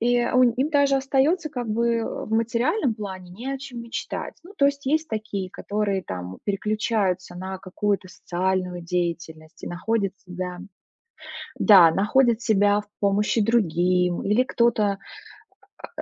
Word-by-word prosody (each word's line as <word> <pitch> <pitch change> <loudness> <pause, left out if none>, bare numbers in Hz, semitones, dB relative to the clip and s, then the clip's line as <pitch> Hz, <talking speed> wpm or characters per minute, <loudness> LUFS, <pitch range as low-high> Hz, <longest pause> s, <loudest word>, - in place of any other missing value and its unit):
И 245 +1 +2
у 255 0 +3
им 250 +5 +2
даже 280 -2 +3
остается, 285 +5 +1
как 245 -5 -4
бы, 235 +2 +1
э, 225 - -3
в - - -11
материальном 230 - +1
плане 190 -4 -7
не 245 +9 -5
о 270 - -4
чем 250 -4 -8
мечтать. 235 - -5
Ну, 380 +4 -14
то 280 - +3
есть 280 0 +1
есть 315 +3 +1
такие, 210 -4 -4
которые 200 -1 -2
там 90 0 -7
переключаются 205 -3 -1
на 190 +1 -5
какую-то 195 0 -2
социальную 180 0 -2
деятельность 170 -2 -4
и - - -5
находят 195 +2 -2
себя. 180 0 -5 1.0
Да, 180 -7 +7
находят 235 +4 +2
себя 205 -1 +3
в 205 - -16
помощи 205 +3 +2
другим, 180 -5 +2
или 210 +5 +3
кто-то, 215 -6 +1 1.0
а - - -5
210 Hz, 145 wpm, -24 LUFS, 185-240 Hz, 1.0 s, Да